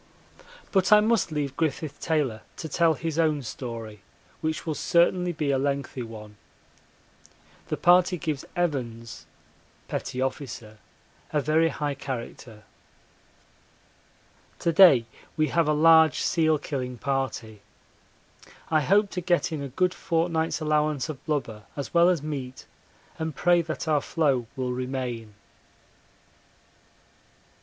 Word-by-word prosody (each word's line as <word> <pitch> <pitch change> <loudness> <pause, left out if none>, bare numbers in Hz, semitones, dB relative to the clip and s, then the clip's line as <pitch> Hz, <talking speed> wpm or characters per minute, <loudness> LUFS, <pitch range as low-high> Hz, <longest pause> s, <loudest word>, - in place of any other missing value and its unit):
But 190 -1 +2
I 210 - +9
must 220 -4 +1
leave 145 -3 -2
Griffith 155 -1 -2
Taylor 145 -9 -1 0.2
to 160 - -5
tell 165 +1 +2
his 165 +1 -3
own 155 -3 +2
story, 115 -4 -7 0.4
which 155 0 -3
will 160 - -1
certainly 175 +3 +2
be 155 -4 -1
a 135 - +1
lengthy 140 -1 -2
one. 105 -3 -9 1.3
The - - -2
party 180 +1 +4
gives 150 -3 -3
Evans 120 -9 -3 0.6
[P.O.] 130 +1 -1 1.0
a 150 - +1
very 155 +3 +2
high 145 -1 -2
character. 120 -5 -7 1.9
To 170 - 0
day 155 -10 +7 0.3
we 155 0 +2
have 170 -2 +2
a - - +3
large 160 0 +5
seal 160 -3 +2
killing 130 -4 -4
party. 120 -4 -3 1.1
I 155 -1 +4
hope 200 +5 +3
to 180 - -3
get 175 -1 +1
in 155 -3 -3
a 140 - -4
good 180 +8 0
fortnight's 165 -1 -1
allowance 150 -3 0
of 150 -4 -7
blubber 115 -8 -3
as 140 - -6
well 170 +1 +6
as 170 -5 0
meat, 135 -4 -6 0.5
and 160 -1 -3
pray 175 -1 +3
that 155 -1 -5
our 150 -2 +2
floe 135 -8 0
will 130 -2 -2
remain. 125 -4 -4
150 Hz, 125 wpm, -26 LUFS, 130-165 Hz, 1.9 s, I